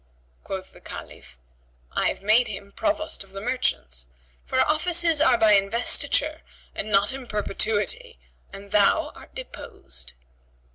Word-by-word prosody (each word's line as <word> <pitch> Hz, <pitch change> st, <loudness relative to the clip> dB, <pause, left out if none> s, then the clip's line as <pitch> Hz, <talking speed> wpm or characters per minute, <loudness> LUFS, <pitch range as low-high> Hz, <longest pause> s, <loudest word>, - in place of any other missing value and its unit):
Quoth -, -, -6 dB
the -, -, -16 dB
Caliph, -, -, -10 dB, 0.5 s
"I -, -, +1 dB
have -, -, -3 dB
made 220 Hz, +4 st, +4 dB
him 200 Hz, -1 st, -7 dB
Provost 315 Hz, -2 st, -1 dB
of 195 Hz, 0 st, -20 dB
the 195 Hz, -, -5 dB
merchants, 195 Hz, -, -2 dB, 0.4 s
for 260 Hz, -, +2 dB
offices 330 Hz, +1 st, +2 dB
are 255 Hz, -5 st, +5 dB
by 220 Hz, -2 st, +5 dB
investiture 240 Hz, +9 st, +2 dB, 0.3 s
and 215 Hz, -, -4 dB
not 200 Hz, +3 st, +3 dB
in 265 Hz, -2 st, -7 dB
perpetuity, 210 Hz, -, -1 dB, 0.3 s
and 200 Hz, 0 st, -11 dB
thou 205 Hz, -1 st, +3 dB
art -, -, -15 dB
deposed." 395 Hz, -, -8 dB
225 Hz, 135 wpm, -25 LUFS, 200-305 Hz, 0.5 s, are